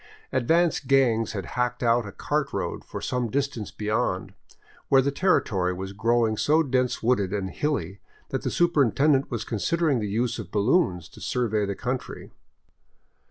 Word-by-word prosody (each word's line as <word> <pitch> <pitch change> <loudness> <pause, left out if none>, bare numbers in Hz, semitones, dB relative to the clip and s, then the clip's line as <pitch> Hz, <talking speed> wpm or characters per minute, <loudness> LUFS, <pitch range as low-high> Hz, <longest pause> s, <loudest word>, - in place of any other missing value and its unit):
Advance 160 +6 +2
gangs 120 -6 +2
had 95 -4 -4
hacked 125 0 -1
out 115 -1 +2
a - - -7
cart - - -2
road - - -3
for - - -7
some 125 -2 -1
distance 135 -5 -2
beyond, 105 -3 -2 0.6
where 135 - +6
the 140 +2 +2
territory 105 - +1
was 95 +1 -6
growing 115 +1 +1
so 155 +7 +3
dense 130 -4 0
wooded 105 -6 +2
and 100 -2 -2
hilly 100 - -2 0.3
that - - -2
the - - -2
superintendent 145 -3 +2
was 115 -3 -3
considering 145 - 0
the 105 -2 -3
use 115 +3 -1
of - - -7
balloons 105 - +1
to - - -15
survey 110 -4 0
the 100 - -3
country. 125 +4 -5
120 Hz, 160 wpm, -25 LUFS, 105-135 Hz, 0.6 s, where